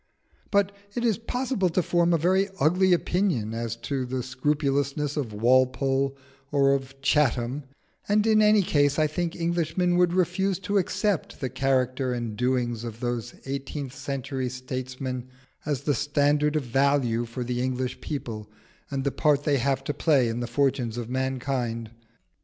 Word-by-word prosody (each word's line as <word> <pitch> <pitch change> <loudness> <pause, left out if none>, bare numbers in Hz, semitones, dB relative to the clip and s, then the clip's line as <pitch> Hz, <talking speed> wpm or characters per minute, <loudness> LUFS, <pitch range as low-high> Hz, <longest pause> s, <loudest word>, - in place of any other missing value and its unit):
But 200 -1 +2 0.2
it 240 -1 -1
is 225 -3 +2
possible 245 -4 -1
to 175 +2 +1
form 175 +1 +2
a 170 - +4
very 190 +5 +2
ugly 180 +6 +3
opinion 175 - +1
as 115 0 -3
to 135 -2 -1
the 125 0 -3
scrupulousness 140 +2 0
of 135 -7 -2
Walpole 130 +4 +2 0.3
or 140 -1 +4
of 135 0 -4
Chatham; 135 -1 +1 0.4
and 210 +1 +3
in 215 -1 +5
any 210 -1 +5
case 145 -4 +2
I 155 - +4
think 165 +2 -2
Englishmen 170 +1 0
would 180 -1 +4
refuse 185 +1 +1
to 200 +2 +1
accept 195 0 -1
the 130 - -2
character 130 -1 +1
and 120 -3 -3
doings 120 -1 0
of 115 -1 -6
those 120 -1 -3
eighteenth 135 0 -4
century 135 -1 -3
statesmen 130 0 -5 0.4
as 145 -3 -1
the 145 - +2
standard 145 +1 +2
of 150 - +1
value 125 -2 +2
for 120 +2 -5
the 125 0 -2
English 130 0 -2
people 110 -7 -5 0.4
and 135 -1 -2
the 140 - 0
part 145 -1 +2
they 145 -2 +2
have 135 +1 0
to 145 - -2
play 140 -8 +3
in 115 +1 -2
the 120 - -3
fortunes 125 -2 0
of 120 0 -5
mankind. 130 -3 -2
135 Hz, 160 wpm, -26 LUFS, 125-160 Hz, 0.4 s, in